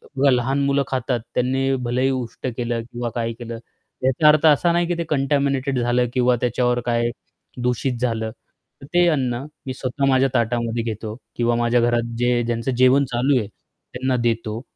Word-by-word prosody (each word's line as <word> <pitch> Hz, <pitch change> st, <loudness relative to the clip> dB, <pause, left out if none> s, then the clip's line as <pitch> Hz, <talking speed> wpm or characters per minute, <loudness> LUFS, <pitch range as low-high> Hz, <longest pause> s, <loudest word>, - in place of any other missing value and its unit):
बघा 140 Hz, +1 st, +3 dB
लहान 130 Hz, +3 st, +1 dB
मुलं 140 Hz, 0 st, +2 dB
खातात, 130 Hz, -1 st, -1 dB
त्यांनी 135 Hz, +2 st, +1 dB
भलेही 125 Hz, +3 st, +1 dB
उष्ट 130 Hz, -1 st, -4 dB
केलं 120 Hz, -1 st, -1 dB
किंवा 120 Hz, 0 st, -5 dB
काय 115 Hz, -1 st, -1 dB
केलं, 115 Hz, 0 st, -7 dB, 0.4 s
याचा 135 Hz, +4 st, +3 dB
अर्थ 150 Hz, +1 st, +5 dB
असा 155 Hz, +3 st, +4 dB
नाही 175 Hz, 0 st, +1 dB
की 175 Hz, -, 0 dB
ते 170 Hz, -, -1 dB
कंटॅमिनेटेड 140 Hz, -2 st, +1 dB
झालं 120 Hz, +1 st, +1 dB
किंवा 125 Hz, -1 st, +3 dB
त्याच्यावर 125 Hz, 0 st, +1 dB
काय 120 Hz, 0 st, +1 dB, 0.6 s
दूषित 125 Hz, +1 st, -1 dB
झालं 110 Hz, -2 st, -1 dB, 0.5 s
तर -, -, -10 dB
ते 175 Hz, 0 st, +5 dB
अन्न 130 Hz, -4 st, 0 dB, 0.2 s
मी 130 Hz, -, -3 dB
स्वतः 130 Hz, +2 st, -2 dB
माझ्या 135 Hz, 0 st, +3 dB
ताटामध्ये 115 Hz, -1 st, 0 dB
घेतो 110 Hz, -1 st, -5 dB, 0.2 s
किंवा 120 Hz, 0 st, +1 dB
माझ्या 120 Hz, 0 st, +2 dB
घरात 120 Hz, -1 st, 0 dB
जे 120 Hz, 0 st, +2 dB
ज्यांचं 115 Hz, +2 st, -2 dB
जेवण 130 Hz, +2 st, +5 dB
चालू 130 Hz, +3 st, +2 dB
आहे 105 Hz, -, -4 dB
त्यांना 130 Hz, +4 st, -5 dB
देतो 115 Hz, -1 st, -1 dB
125 Hz, 170 wpm, -22 LUFS, 120-135 Hz, 0.6 s, अर्थ